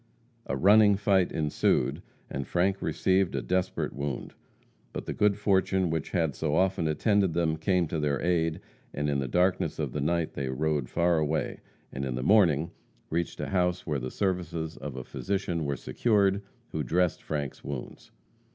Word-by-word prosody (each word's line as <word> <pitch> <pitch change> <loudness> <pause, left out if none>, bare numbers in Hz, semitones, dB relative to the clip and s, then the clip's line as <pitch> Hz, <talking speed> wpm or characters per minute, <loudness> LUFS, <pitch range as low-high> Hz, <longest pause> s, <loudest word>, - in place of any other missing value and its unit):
A 70 - -1
running 105 +5 +6
fight 95 -2 +2
ensued, 75 -5 +1 0.3
and 65 -1 -5
Frank 95 +2 +1
received 95 -1 +1
a - - -1
desperate 95 0 -1
wound. 70 -1 -4 0.6
But - - -5
the - - -3
good 105 -1 +2
fortune 95 -3 +2
which 80 -2 -2
had 80 -6 0
so 75 0 -1
often 95 -2 +2
attended 95 +3 +2
them 80 -2 +1
came 90 +2 +1
to 80 - -2
their 70 -2 0
aid, 80 -2 0 0.3
and 75 +1 -1
in 70 - 0
the 65 - -2
darkness 90 +7 +1
of - - -2
the 75 - -3
night 85 +2 0
they 70 -1 -3
rode 75 -1 -1
far 85 -1 +2
away, 80 0 -1 0.3
and 70 - -4
in 65 -2 -2
the 65 - -3
morning 85 -4 +4 0.4
reached 85 +1 -2
a - - -3
house 90 -1 0
where 75 -4 -1
the 65 +1 -4
services 85 -4 -2
of 70 0 -7
a 65 - -5
physician 95 -1 -2
were 70 -2 -1
secured, 100 - +1 0.3
who - - -3
dressed 90 0 +1
Frank's 75 -3 -4
wounds. 70 -3 -7
85 Hz, 175 wpm, -28 LUFS, 75-95 Hz, 0.6 s, running